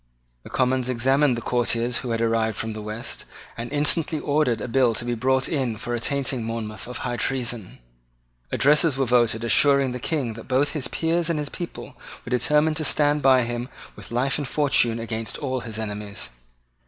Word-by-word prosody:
The - - -12
Commons 130 0 +1
examined 130 +2 +2
the 115 - -5
couriers 120 0 0
who 125 - -4
had 115 0 -1
arrived 115 -2 +1
from 110 0 -3
the 110 - -6
West, 105 +2 -6 0.3
and 115 +1 -6
instantly 150 +2 +3
ordered 145 -6 +1
a 105 - -4
bill 120 -1 +2
to 120 - -3
be 120 - -1
brought 130 +3 +1
in 130 -8 -1
for 120 +3 -4
attainting 130 0 0
Monmouth 110 -2 -5
of 125 - -6
high 120 -1 -2
treason. 120 -7 -2 0.7
Addresses 145 +4 +3
were 135 - +1
voted 120 -2 +2
assuring 140 +2 +4
the 125 - -5
King 130 -4 -2
that 115 +1 -11
both 135 +3 +2
his 145 -5 -2
peers 165 +3 0
and 165 - 0
his 150 -1 -3
people 175 -2 -7 0.3
were 115 - -8
determined 150 +5 +2
to 160 - 0
stand 145 +1 +2
by 130 -2 +5
him 120 +1 -4 0.3
with - - -11
life 130 +4 0
and 145 - -3
fortune 135 -5 +2
against 115 -1 -4
all 130 -2 -2
his 110 -3 -7
enemies. 105 - -5
125 Hz, 190 wpm, -24 LUFS, 115-140 Hz, 0.7 s, by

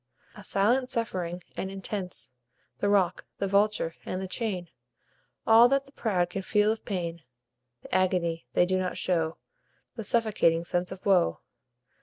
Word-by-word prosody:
A 205 - -11
silent 240 +7 +2
suffering, 180 -7 -2
and 190 - -3
intense; 190 -7 -4 0.5
The 205 - +1
rock, 195 -3 +2
the 200 - -1
vulture, 200 -4 +2
and 185 - -3
the 190 - -4
chain; 185 -5 -2 0.8
All 230 +2 +7
that 275 +1 +2
the 275 - -19
proud 185 -9 0
can 195 - -3
feel 210 +2 +2
of 220 - -4
pain; 170 -4 -3 0.6
The - - -10
agony 180 -3 +1
they 180 - +5
do 185 +1 +1
not 185 -1 -2
show; 165 -3 0 0.6
The 225 - -4
suffocating 200 -7 +2
sense 175 +1 -1
of 190 -1 -9
woe. 185 -4 +3
190 Hz, 155 wpm, -28 LUFS, 175-210 Hz, 0.8 s, All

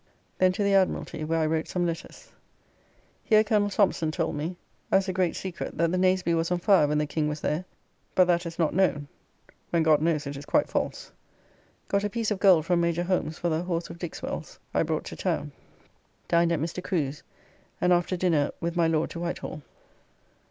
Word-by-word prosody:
Then 185 0 +5
to 205 - -1
the 200 0 +2
Admiralty, 190 -4 +1
where 165 +1 0
I 160 - +2
wrote 160 0 0
same 180 -1 -1
letters. 170 - -6 0.9
Here 215 -1 +5
Coll. 210 -1 +2
Thompson 190 -5 +1
told 160 0 -2
me, 160 +5 -3 0.4
as 195 0 +3
a 185 - -1
great 180 -2 +1
secret; 185 -3 -5
that 170 0 +2
the 185 - 0
Nazeby 185 -2 +2
was 165 0 0
on 180 - +1
fire 175 -3 +4
when 150 +1 0
the 150 - +1
King 150 0 -1
was 150 0 -4
there, 155 +5 -1 0.5
but 185 - +6
that 175 -1 +1
is 165 - -8
not 160 -3 +1
known; 150 -6 +1 0.6
when 170 -1 +2
God 155 -2 +4
knows 155 -2 +1
it 140 0 -5
is 140 +1 -8
quite 295 - +2
false. - - -3 0.8
Got 200 0 +1
a 205 - 0
piece 225 0 -2
of 205 - -1
gold 180 -6 +5
from 175 0 +2
Major 170 0 +1
Holmes 175 -3 -1
for 175 - -1
the 160 0 0
horse 175 -1 -3
of 170 - -11
Dixwell's 175 -2 -6 0.2
I - - +2
brought - - -1
to - - -8
town. - - -2 0.8
Dined 170 0 +3
at 170 - +1
Mr. 165 +4 -4
Crew's, 150 -5 -2 0.6
and 180 0 +3
after 175 +1 +1
dinner 165 -5 +2
with 170 0 -3
my 170 -1 +3
Lord 160 -1 0
to 170 - -6
Whitehall. 170 -3 -4
170 Hz, 205 wpm, -27 LUFS, 160-185 Hz, 0.9 s, but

